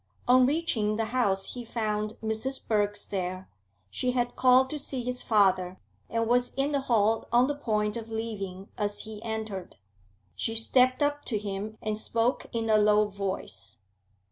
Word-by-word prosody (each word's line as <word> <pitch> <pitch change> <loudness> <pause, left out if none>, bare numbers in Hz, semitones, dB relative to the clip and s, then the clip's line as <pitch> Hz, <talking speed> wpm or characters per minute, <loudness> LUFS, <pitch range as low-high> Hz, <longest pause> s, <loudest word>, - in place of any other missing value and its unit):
On 255 0 +6
reaching 255 -9 0
the 225 +1 0
house 215 -5 0
he 245 - -6
found 215 -2 -2
Mrs. 220 +5 -2
Birks 205 -1 0
there; 185 -1 -4 0.4
she 250 - -1
had 245 -1 -1
called 255 +1 +5
to 305 - -2
see 265 -3 -4
his 250 +1 -2
father, 190 -4 +2 0.3
and 230 0 0
was 245 +2 +1
in 275 +2 0
the 285 - +1
hall 225 -4 +1
on 240 +2 +5
the 290 - -1
point 210 -7 -1
of 225 -1 -6
leaving 200 -4 -5
as 205 0 -2
he 215 -1 -9
entered. 220 -4 -5 0.6
She 225 - -2
stepped 255 +4 +4
up 290 0 0
to 220 - 0
him, 205 +1 -5
and 215 0 -2
spoke 230 +3 0
in 230 -2 -2
a 215 -1 +4
low 210 0 +4
voice. 155 - -5
220 Hz, 170 wpm, -28 LUFS, 205-250 Hz, 0.6 s, On